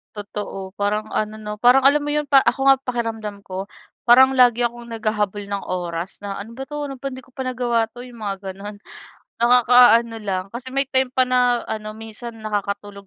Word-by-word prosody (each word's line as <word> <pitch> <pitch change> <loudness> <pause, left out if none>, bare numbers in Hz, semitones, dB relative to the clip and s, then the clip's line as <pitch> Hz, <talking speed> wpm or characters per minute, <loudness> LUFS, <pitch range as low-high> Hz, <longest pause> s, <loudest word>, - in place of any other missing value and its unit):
Totoo. 200 -2 -6
Parang 210 +1 -1
ano, 215 0 -2
'no, 210 -1 -6
parang 255 +2 +5
alam 290 +1 +5
mo 295 - -3
'yun 300 0 0
pa 275 -1 +6
ako - - +1
nga 270 0 +7
pakiramdam 225 -5 -4
ko, 190 +2 -6 0.4
parang 260 +2 +7
lagi 245 -2 +4
akong 240 0 -6
naghahabol 210 -2 -2
ng 200 0 -4
oras 175 0 -4
na, 200 - -3
"ano 230 +4 -11
ba 270 - -5
'to, 295 -1 -5
ano 270 - -7
ba 275 +1 -5
hindi 260 - -8
ko 255 - -23
pa 260 0 -6
nagawa 240 -2 0
'to?" 240 +2 -12
yung 245 -2 -11
mga 195 -1 -4
gano'n, 205 +2 -9 0.7
nakakaano 240 -1 +5
lang. 185 -2 -2
Kasi 245 +2 -7
may 275 0 0
time 265 -2 +1
pa 255 0 +2
na 250 -1 +2
ano 215 -1 -5
minsan 225 +1 -9
nakakatulog 200 -1 -4
230 Hz, 200 wpm, -21 LUFS, 205-255 Hz, 0.7 s, nga